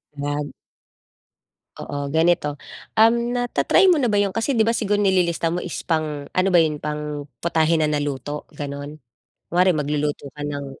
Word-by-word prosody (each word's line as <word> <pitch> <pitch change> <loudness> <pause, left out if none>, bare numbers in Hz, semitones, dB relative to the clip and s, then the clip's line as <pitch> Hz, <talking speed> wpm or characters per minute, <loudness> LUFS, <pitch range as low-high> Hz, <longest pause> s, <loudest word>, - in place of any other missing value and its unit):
Nag 145 0 -3 1.3
Oo, 145 - -5
ganito, 160 -1 +3 0.5
um, 225 +1 +7 0.2
nata-try 245 +9 +3
mo 360 - +6
na 245 -5 +1
ba 205 - +3
'yun? 200 0 0
Kasi 225 +5 0
'di 225 -4 +2
ba, 230 - +2
siguro 205 -2 0
nililista 180 -4 +2
mo 175 +2 -2
is - - -5
pang 155 -3 -1
ano 185 +1 0
ba 175 - +6
'yun, 155 -2 0
pang 150 -1 -4 0.2
putahe 165 -1 +2
na 155 - +2
naluto 145 0 -3
gano'n? 145 +1 -7 0.5
Kunwari 180 +2 +4
magluluto 145 -1 -2
ka 150 - -12
ng 145 -1 -4
155 Hz, 160 wpm, -22 LUFS, 145-190 Hz, 1.3 s, um